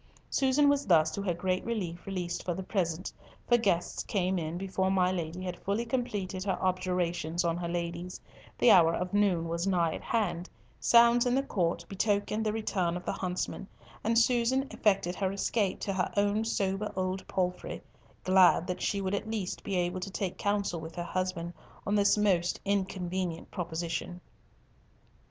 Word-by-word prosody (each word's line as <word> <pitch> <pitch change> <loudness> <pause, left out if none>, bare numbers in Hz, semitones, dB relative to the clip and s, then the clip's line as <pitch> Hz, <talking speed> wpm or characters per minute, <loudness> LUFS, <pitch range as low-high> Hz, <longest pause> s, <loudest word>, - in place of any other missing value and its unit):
Susan 275 +2 +3
was 285 0 +2
thus, 160 -3 +5
to 200 - -4
her 195 -2 0
great 185 +1 -1
relief, 185 -8 -4
released 180 -3 -3
for 175 - -2
the 190 - -5
present, 185 -3 -2 0.3
for 240 - +5
guests 195 -7 0
came 185 -2 0
in 160 +1 -4
before 190 0 -1
my 185 -1 +3
Lady 175 0 -4
had 180 -1 -5
fully 205 +4 -1
completed 205 -6 -2
her 195 -1 -1
objurgations 180 -2 0
on 165 -1 +1
her 175 0 -3
ladies, 170 +1 -4 0.4
the 245 - +6
hour 165 -2 +6
of 180 +1 -3
noon 190 -5 +2
was 170 +3 -2
nigh 170 -4 +2
at - - -6
hand, 195 -6 -1 0.3
sounds 235 +1 +5
in 245 - +2
the 270 - +2
court 170 -7 -1
betokened 205 +2 0
the 215 - +1
return 190 -5 -1
of 180 - -9
the - - 0
huntsmen, 185 +1 -3 0.4
and 230 +1 +2
Susan 245 +3 +3
effected 195 -4 +1
her 190 0 -1
escape 200 0 0
to 195 - -2
her 185 -1 -1
own 205 +2 +2
sober 205 -2 -1
old 185 0 -2
palfrey—glad 185 0 +1
that 180 -1 -4
she 200 - 0
would 190 0 -2
at 210 +2 -2
least 210 -5 -3
be 195 - -2
able 180 +1 0
to 185 - -5
take 190 -1 -3
counsel 200 -4 -1
with 160 +1 -8
her 175 - -3
husband 175 -1 -3 0.3
on 205 - 0
this 205 0 +4
most 185 -4 +2
inconvenient 185 -3 -2
proposition. 170 0 -4
185 Hz, 175 wpm, -30 LUFS, 175-205 Hz, 0.4 s, the